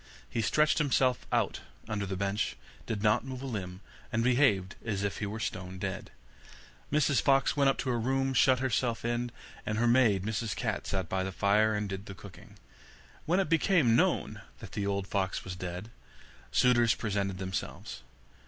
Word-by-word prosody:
He 115 - -2
stretched 150 +8 +3
himself 130 -4 +2
out - - +1 0.3
under 105 -2 -2
the 95 - -3
bench, 100 - -1 0.3
did 110 -3 -3
not 105 +2 +3
move 130 0 -7
a - - -4
limb, 95 -7 -5 0.3
and 115 -1 +1
behaved 120 -7 +3
as 100 -3 -2
if 100 - -2
he 105 - -2
were 110 +2 -5
stone 95 -3 -4
dead. 95 0 -4 0.8
Mrs 145 -3 +3
Fox 135 0 +3
went 140 -2 +4
up 135 - +1
to 130 - -1
her 120 - 0
room, 135 +3 0
shut 130 +1 +5
herself 125 -2 -1
in, 120 +1 -1 0.3
and 110 - -2
her 115 - +2
maid, 115 -6 +4
Miss 110 0 -2
Cat, - - -2
sat 95 -3 -2
by 95 +3 -1
the 95 +1 -3
fire, 105 +3 +3
and 105 0 -1
did 95 +1 -6
the 100 - -8
cooking. 95 0 -13 0.7
When 175 +4 +3
it 195 - +1
became 160 -6 +3
known - - +1 0.2
that - - -11
the 100 -1 -2
old 100 -1 -1
fox 95 -1 -2
was 90 -1 -6
dead, 90 +4 -6 0.6
suitors 120 -2 +4
presented 100 -3 -2
themselves. 95 0 -5
110 Hz, 180 wpm, -30 LUFS, 100-125 Hz, 0.8 s, shut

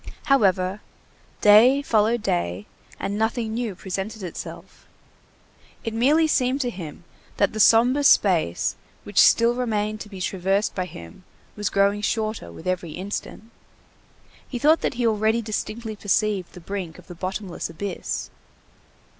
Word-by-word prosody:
However, 195 -7 +2 0.6
day 235 +7 +6
followed 225 -1 +2
day, 85 +3 -1 0.3
and 195 +1 -3
nothing 220 0 -1
new 230 -4 -3
presented 195 +3 -5
itself. 175 - -9 1.0
It 225 - -3
merely 285 +8 +3
seemed 260 -3 +1
to 245 -2 -1
him, 175 -5 -9 0.3
that 200 +1 +2
the 215 - -4
sombre 245 +6 +5
space 175 - +3 0.3
which - - +3
still 235 +1 +5
remained 215 -3 -2
to 210 - -8
be 195 -2 -9
traversed 190 +3 0
by 185 - -2
him 85 - -12 0.3
was 210 -2 -2
growing 200 +1 +2
shorter 215 - -2
with 85 - -12
every 180 -3 -2
instant. 205 +4 -6 1.0
He 250 - -4
thought 305 +6 +4
that - - -1
he 240 0 -1
already 220 +1 +2
distinctly 220 +1 -4
perceived 205 -2 0
the - - -10
brink 180 -3 -5
of - - -15
the 175 - -10
bottomless 185 +1 -5
abyss. 190 +5 -5
210 Hz, 140 wpm, -24 LUFS, 185-230 Hz, 1.0 s, day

